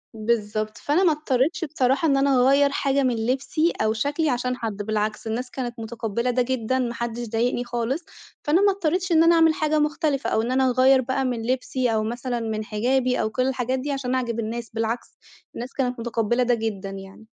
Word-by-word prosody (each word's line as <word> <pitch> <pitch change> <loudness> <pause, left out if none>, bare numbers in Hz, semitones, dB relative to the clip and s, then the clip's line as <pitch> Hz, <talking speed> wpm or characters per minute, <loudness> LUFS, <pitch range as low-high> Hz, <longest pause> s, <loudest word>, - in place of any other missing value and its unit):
بالضبط، 215 -1 -1
فأنا 305 +6 +1
ما 345 - +5
اضطريتش 300 +2 0
بصراحة 275 0 +1
إن 275 -2 +3
أنا 275 0 +3
أغيّر 275 +2 +5
حاجة 275 0 +1
من 255 -2 +1
لبسي 275 +6 0
أو 220 0 +2
شكلي 290 +6 0
عشان 250 0 -1
حد، 220 -4 -4
بالعكس 215 +1 -2
الناس 245 +3 -3
كانت 240 -2 -5
متقبلة 225 +1 -3
ده 250 +1 +2
جدًا، 260 0 -1
ما 240 -2 -1
حدش 235 0 -4
ضايقني 240 +2 0
خالص، 245 +6 -3 0.4
فأنا 325 +6 +3
ما 405 - +5
اضطريتش 370 -1 -1
إن 325 0 +6
أنا 335 +1 +5
أعمل 325 -1 +5
حاجة 310 0 +1
مختلفة 300 -2 0
أو 220 - +1
إن 235 +2 -2
أنا 260 0 +3
أغيّر 260 +1 +5
بقى 260 +1 -1
من 240 -3 -2
لبسي 250 -1 0
أو 215 - +1
مثلًا 240 +2 -3
من 220 -1 -3
حجابي 250 +4 +1
أو 215 - 0
كل 255 +3 0
الحاجات 260 0 -1
دي 285 +3 -3
عشان 265 -2 -2
أعجب 235 -3 -2
الناس، 230 +1 -4
بالعكس، 225 +1 -3 0.4
الناس 245 +2 -6
كانت 250 -3 -1
متقبلة 240 +1 0
ده 245 - +2
جدًا 215 -4 -3
يعني. 195 +2 -10
250 Hz, 200 wpm, -24 LUFS, 230-275 Hz, 0.4 s, إن